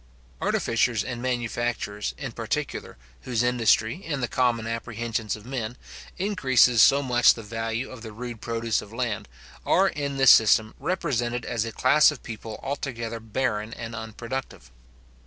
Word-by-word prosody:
Artificers 115 -1 +1
and 120 -2 -5
manufacturers, 120 -4 -2
in 140 -4 -5
particular, 120 - -4 0.2
whose 120 -2 -1
industry, 120 - +2
in 145 -4 -3
the 120 - -1
common 120 -2 +1
apprehensions 115 -1 -3
of 105 0 -13
men, 125 -2 -4 0.4
increases 130 - +4
so 140 +1 +6
much 125 -2 +5
the 115 - -8
value 115 +2 -3
of 130 -3 -10
the 110 -1 -8
rude 120 0 -7
produce 115 -1 -1
of 105 - -12
land, 115 - -3 0.4
are 195 +1 +4
in 140 -2 -3
this 135 -1 +8
system 110 0 +5
represented 120 -10 -1
as 115 -2 -1
a 115 - -4
class 130 +7 +5
of 150 -4 -6
people 110 -1 -7
altogether 115 -5 -4
barren 110 -1 -2
and 115 -1 -7
unproductive. 115 - -6
120 Hz, 150 wpm, -25 LUFS, 115-130 Hz, 0.4 s, this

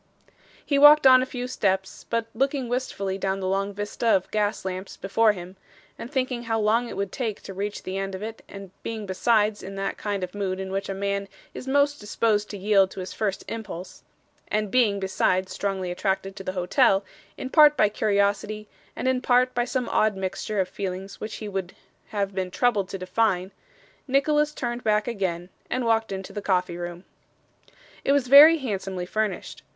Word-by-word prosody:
He 280 -2 +2
walked 295 0 +8
on 255 -1 +8
a 260 - -2
few 250 -1 -5
steps, 190 -6 -1
but 230 -1 0
looking 270 +2 0
wistfully 200 -6 -2
down 195 0 -1
the 190 - -3
long 195 +1 0
vista 205 +3 -4
of 190 -4 +2
gas 210 -2 -1
lamps 185 +1 -5
before 215 +3 +3
him, 185 0 -10 0.4
and 235 - -9
thinking 255 -3 -2
how 225 -1 0
long 225 +3 +2
it - - -7
would 200 -1 -2
take 225 -6 -4
to 195 - -8
reach 200 +2 -4
the 190 +1 -4
end 195 0 -3
of 190 - -7
it 225 +1 -6
and 195 -2 -10
being 220 -2 -5
besides 210 +2 +1
in 195 +1 -8
that 195 0 -3
kind 205 -2 -2
of 180 - -5
mood 195 -2 -2
in 190 0 -5
which 195 +1 -3
a 195 - -3
man 200 0 -2 0.3
is 255 - -8
most 285 +1 +2
disposed 210 0 0
to 205 - -6
yield 195 -1 +3
to 190 - -9
his 185 - -6
first 200 -3 -2
impulse 195 -5 -7 0.5
and 210 -1 -1
being, 220 -6 +3
besides, 190 -1 0
strongly 190 -3 -2
attracted 195 +1 -2
to 195 - -8
the 185 - -4
hotel, 195 +2 +3 0.3
in 260 - -6
part 300 -2 +7
by 210 - +5
curiosity, 210 0 0 0.3
and - - -3
in 260 -1 +1
part 255 0 +3
by 240 0 0
some 255 -1 -2
odd 215 -1 +2
mixture 195 +2 -3
of 185 - +1
feelings 195 +1 -6
which 215 0 -5
he 215 - -6
would 195 -2 -4 0.3
have 200 -2 -2
been 185 -1 -2
troubled 205 -2 +1
to 195 - -4
define 185 0 0 0.6
Nicholas 295 +3 +2
turned 240 -4 -4
back 210 0 +2
again, 185 -6 -2 0.2
and 250 -1 -1
walked 225 -1 +1
into 190 -1 -6
the 205 - -4
coffee 180 -3 0
room. 175 0 -6 1.0
It 275 - +3
was 275 -3 +1
very 300 +4 +10
handsomely 195 - -4
furnished. 210 0 -3
205 Hz, 195 wpm, -25 LUFS, 190-240 Hz, 1.0 s, very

